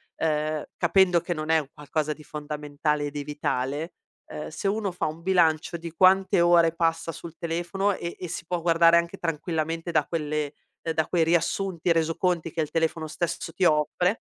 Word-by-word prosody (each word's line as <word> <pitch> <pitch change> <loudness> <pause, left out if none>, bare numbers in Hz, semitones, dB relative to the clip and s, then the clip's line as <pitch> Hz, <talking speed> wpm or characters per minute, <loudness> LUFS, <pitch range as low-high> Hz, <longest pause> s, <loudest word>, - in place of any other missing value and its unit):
ehm, 155 -1 -1
capendo 180 -3 +4
che 175 0 -2
non 155 0 -5
è 160 - +5
un 140 -2 -7
qualcosa 150 +1 -2
di 150 0 -7
fondamentale 150 0 -2
e 145 - -4
di 145 -1 -4
vitale. 145 +2 -2 0.3
Uhm, 150 - -7
se 160 +5 -4
uno 205 -1 0
fa 180 - -3
un 155 +2 -4
bilancio 170 -3 +2
di 170 0 -7
quante 190 +1 +4
ore 170 -1 +5
passa 165 0 0
sul 165 0 -9
telefono 175 +4 -1
e 170 - -5
e 180 - -5
si 170 0 -6
può 175 0 -2
guardare 165 0 +5
anche 170 0 0
tranquillamente 165 +1 -2
da 155 -3 +2
quelle 150 -2 -2 0.3
ehm, 165 - -2
da 160 -1 0
quei 170 -2 +2
riassunti, 170 +1 +1
resoconti 165 +1 0
che 165 - -6
il 150 - -3
telefono 160 -1 0
stesso 165 0 -3
ti 190 - -2
offre, 175 +6 +2
165 Hz, 185 wpm, -26 LUFS, 155-175 Hz, 0.3 s, è